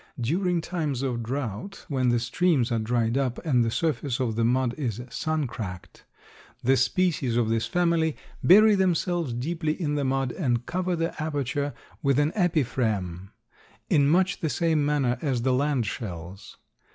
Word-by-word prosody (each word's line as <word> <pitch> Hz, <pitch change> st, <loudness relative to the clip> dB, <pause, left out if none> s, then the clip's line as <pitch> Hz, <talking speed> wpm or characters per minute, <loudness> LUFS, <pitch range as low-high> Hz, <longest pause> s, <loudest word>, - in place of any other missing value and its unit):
During 175 Hz, +8 st, 0 dB
times 155 Hz, -7 st, -2 dB
of 125 Hz, -3 st, -1 dB
drought 125 Hz, -, -5 dB
when 130 Hz, -3 st, +1 dB
the 120 Hz, -, +3 dB
streams 130 Hz, +2 st, +1 dB
are 115 Hz, -, +1 dB
dried 115 Hz, +2 st, 0 dB
up 130 Hz, -3 st, -1 dB
and 125 Hz, -6 st, +3 dB
the 115 Hz, -, 0 dB
surface 140 Hz, -1 st, -1 dB
of 120 Hz, -4 st, -1 dB
the 115 Hz, -, +1 dB
mud 125 Hz, +1 st, +2 dB
is 120 Hz, -7 st, -3 dB
sun 155 Hz, +4 st, -1 dB
cracked, 90 Hz, -7 st, -7 dB, 0.6 s
the 130 Hz, +2 st, +4 dB
species 135 Hz, -2 st, +1 dB
of 115 Hz, -2 st, +2 dB
this 115 Hz, 0 st, 0 dB
family 170 Hz, -2 st, +1 dB, 0.3 s
bury 215 Hz, +4 st, +7 dB
themselves 175 Hz, -5 st, +1 dB
deeply 155 Hz, +6 st, -2 dB
in 150 Hz, -5 st, -1 dB
the 145 Hz, -1 st, 0 dB
mud 135 Hz, -1 st, 0 dB
and 120 Hz, -7 st, -1 dB
cover 180 Hz, 0 st, -1 dB
the 165 Hz, 0 st, -1 dB
aperture 145 Hz, -2 st, -2 dB, 0.3 s
with 140 Hz, -3 st, +2 dB
an 145 Hz, +1 st, +2 dB
epiphragm, 110 Hz, -, 0 dB, 0.6 s
in 140 Hz, -2 st, +4 dB
much 185 Hz, +4 st, +2 dB
the 160 Hz, -, -1 dB
same 160 Hz, -2 st, +1 dB
manner 145 Hz, -4 st, +1 dB
as 130 Hz, -7 st, -1 dB
the 130 Hz, 0 st, +2 dB
land 140 Hz, -2 st, +1 dB
shells. 95 Hz, -3 st, -7 dB
135 Hz, 165 wpm, -26 LUFS, 120-160 Hz, 0.6 s, bury